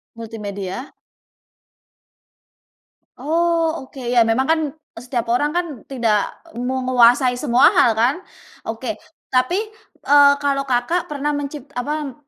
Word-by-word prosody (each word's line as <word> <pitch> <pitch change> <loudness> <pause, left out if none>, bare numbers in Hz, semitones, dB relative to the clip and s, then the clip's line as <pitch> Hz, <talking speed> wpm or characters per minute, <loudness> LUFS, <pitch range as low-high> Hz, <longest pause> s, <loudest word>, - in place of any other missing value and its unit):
Multimedia. 215 0 -7 2.2
Oh 330 -1 0
oke, 265 0 -12
ya 240 -2 +4
memang 225 +4 +1
kan 320 0 +3 0.4
setiap 240 -1 -4
orang 290 +6 +1
kan 350 0 0 0.2
tidak 230 -6 0 0.2
menguasai 250 0 +3
semua 250 -1 +4
hal 230 - +5
kan. 235 +5 +2 0.5
Oke 225 -1 -4 0.4
tapi, 255 +8 +2 0.5
eee, 285 0 +7
kalau 280 -1 +1
Kakak 255 +8 0
pernah 295 0 -2
mencip 285 -1 -5
apa 290 +1 -3
255 Hz, 110 wpm, -20 LUFS, 235-290 Hz, 2.2 s, eee